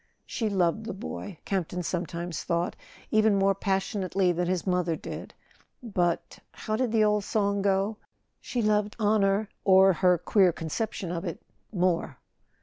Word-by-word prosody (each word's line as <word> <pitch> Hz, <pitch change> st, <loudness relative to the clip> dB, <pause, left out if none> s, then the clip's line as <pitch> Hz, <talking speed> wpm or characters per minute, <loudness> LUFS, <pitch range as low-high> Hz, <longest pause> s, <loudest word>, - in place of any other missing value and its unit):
She 225 Hz, -2 st, -2 dB
loved 195 Hz, +2 st, 0 dB
the 225 Hz, -, -4 dB
boy, 200 Hz, -3 st, -7 dB
Campton 180 Hz, -2 st, -2 dB
sometimes 175 Hz, 0 st, -3 dB
thought, 170 Hz, +1 st, -1 dB, 0.4 s
even 215 Hz, -1 st, +4 dB
more 195 Hz, 0 st, +3 dB
passionately 195 Hz, -1 st, 0 dB
than 175 Hz, 0 st, -1 dB
his 180 Hz, -1 st, -1 dB
mother 180 Hz, -3 st, +1 dB
did; -, -, -8 dB, 0.5 s
but—how 195 Hz, +1 st, -2 dB
did 245 Hz, 0 st, 0 dB
the 220 Hz, -1 st, +3 dB
old 210 Hz, -1 st, +2 dB
song 200 Hz, -1 st, 0 dB
go 200 Hz, +2 st, +1 dB, 0.4 s
?—she 240 Hz, -2 st, -2 dB
loved 210 Hz, 0 st, +1 dB
honour, 205 Hz, -1 st, +2 dB, 0.2 s
or 190 Hz, 0 st, +6 dB
her 180 Hz, +1 st, +3 dB
queer 190 Hz, +1 st, +3 dB
conception 170 Hz, +3 st, -4 dB
of 170 Hz, 0 st, -3 dB
it, 170 Hz, -4 st, -4 dB, 0.3 s
more. 175 Hz, -8 st, 0 dB
195 Hz, 145 wpm, -27 LUFS, 180-210 Hz, 0.5 s, or